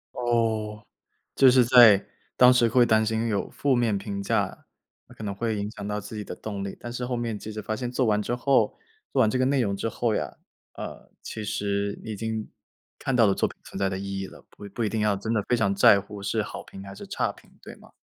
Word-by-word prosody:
哦， 110 -3 0 0.6
就 135 -1 +7
是 125 -1 +5
在， 120 -5 +7 0.3
当 125 0 +7
时 120 -2 +4
会 125 +1 +5
担 110 -1 +3
心 110 +1 0
有 105 -2 -1
负 135 -3 +1
面 115 -4 +1
评 100 0 -4
价， 100 -1 -1 0.4
那 - - -15
可 - - -11
能 100 -2 -3
会 110 +1 -2
影 100 +1 -3
响 100 -2 -8
到 105 0 -2
自 110 +2 -9
己 105 - -5
的 - - -7
动 100 -2 -6
力。 100 - -6
但 120 - -7
是 125 0 -4
后 125 -1 -2
面 115 -3 -3
即 110 - -8
使 110 0 -6
发 110 +1 -3
现 125 -2 -4
做 130 0 0
完 105 -1 +2
之 120 +4 -2
后 125 -4 +2 0.4
做 - - +2
完 110 - +4
这 130 - 0
个 130 - +3
内 135 0 +2
容 100 -4 0
之 115 - -2
后 115 -1 -1
呀， 75 -8 -3 0.4
呃， - - -8
其 110 -1 -6
实 100 0 -2
你 110 - -6
已 - - -5
经， 110 0 -4 0.5
看 135 - -2
到 115 -3 +5
了 100 - +3
作 - - +1
品 - - -15
存 - - -8
在 95 - +1
的 95 0 -3
意 100 0 -4
义 95 - -4
了， - - -15
不 100 - -11
不 120 - -2
一 - - +1
定 110 - -2
要 105 -1 +2
真 110 +3 -3
的 110 - +2
非 125 - +3
常 100 -4 +1
在 100 0 +6
乎 100 0 -10
是 110 +2 0
好 105 - -7
评 95 - -11
还 100 - -9
是 - - -10
差 - - -1
评， - - -21
对 - - -10
吗？ - - -18
110 Hz, 280 characters per minute, -26 LUFS, 100-120 Hz, 0.6 s, 就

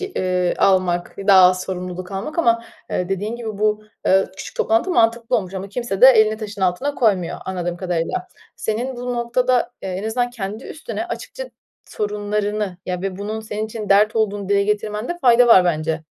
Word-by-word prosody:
eee, 185 - -1
almak, 185 -2 +2
daha 195 -2 +7
az 185 0 +5
sorumluluk 180 0 -6
almak 200 - -5
ama, 230 -7 +2 0.3
eee, 180 - -1
dediğin 205 +4 -2
gibi 220 -4 -6
bu, 215 0 0 0.2
eee, 190 +1 +4
küçük 195 - -9
toplantı 225 +11 +1
mantıklı 235 -4 +2
olmuş 190 -3 -4
ama 190 +1 -5
kimse 205 -2 -4
de 255 - +10
elini 220 -4 +5
taşın 210 -2 -7
altına 190 +11 0
koymuyor 195 -10 +1
anladığım 175 -2 -3
kadarıyla. 180 - -2 0.3
Senin 245 +4 -3
bu 245 0 -3
noktada, 240 +1 +1
eee, - - -4
en 185 +3 -4
azından 245 +2 -1
kendi 215 0 -6
üstüne 320 +2 -6
açıkça - - -7 0.3
sorunlarını, 210 -1 -2
ya, 180 -1 -3
ve 195 -1 -4
bunun 215 +2 -4
senin 215 0 -4
için 215 -1 -7
dert 210 +3 +4
olduğunu 205 -2 -1
dile 200 0 +3
getirmende 210 +9 -2
fayda 245 -2 +6
var 190 -6 +7
bence. 160 -1 -1
210 Hz, 175 wpm, -20 LUFS, 190-235 Hz, 0.3 s, de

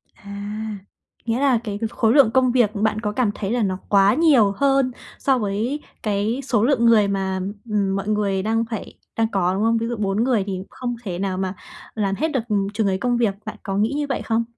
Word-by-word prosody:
À, 205 +2 -6 0.5
nghĩa 230 +1 0
là 270 -3 +3
cái 205 -2 -4
khối 225 0 +2
lượng 275 -6 +6
công 255 0 +3
việc 240 -4 +3
bạn 215 +1 0
có 210 -2 -1
cảm 220 -2 +1
thấy 200 -1 -3
là 240 0 +1
nó 190 -2 -1
quá 200 0 +5
nhiều 270 -8 +4
hơn 270 -1 +2 0.3
so 265 -2 +2
với 220 +7 -2 0.2
cái 210 +3 0
số 235 -5 +1
lượng 240 -2 +3
người 220 -3 +5
mà, 190 -1 -1 0.3
ừm, 200 -2 0
mọi 195 +1 -3
người 205 -2 0
đang 225 +1 +1
phải 225 - -5 0.2
đang 225 0 +2
có, 185 -2 +1
đúng 195 +3 -1
không? 230 +1 +3
Ví 230 0 -2
dụ 240 - -2
4 205 +2 0
người 240 -6 +2
thì 190 -1 -3
không 245 -2 -4
thể 180 -5 -4
nào 190 -1 -2
mà 190 0 -2 0.4
làm 200 -3 0
hết 310 +9 0
được, 265 - 0
ừm, 200 -2 +1
chừng 210 -1 0
ấy 190 - +1
công 245 +4 0
việc 220 -5 +1
bạn 215 - -6
có 195 -2 -3
nghĩ 215 +6 +1
như 295 - 0
vậy 270 - -1
không? 230 0 0
215 Hz, 230 wpm, -22 LUFS, 200-240 Hz, 0.5 s, lượng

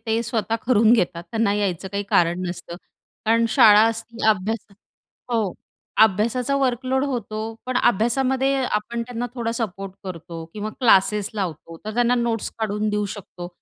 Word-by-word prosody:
ते 225 +1 +1
स्वतः 225 -1 -1
करून 230 -2 +5
घेतात, 180 -7 +1
त्यांना 225 -2 +2
यायचं 195 -3 -1
काही 200 0 -1
कारण 175 +1 +3
नसतं. 175 -1 -6 0.5
कारण 230 +1 +3
शाळा 210 -1 +7
असती, 230 +1 -5
अभ्यास 215 +1 0 0.6
हो. 220 -5 0 0.5
अभ्यासाचा 230 +6 +2
वर्कलोड 260 0 0
होतो 235 -6 -3 0.3
पण 255 0 -1
अभ्यासामध्ये 260 +5 +2
आपण 235 +1 -2
त्यांना 245 0 -4
थोडा 235 -2 -2
सपोर्ट 195 -4 -4
करतो 165 -2 -7
किंवा 215 0 -4
क्लासेस 210 -3 +4
लावतो. 165 -5 -5
तर 215 0 -5
त्यांना 245 +1 +3
नोट्स 235 -2 -1
काढून 215 -1 -1
देऊ 210 0 0
शकतो. 180 -3 -9
220 Hz, 145 wpm, -23 LUFS, 195-235 Hz, 0.6 s, शाळा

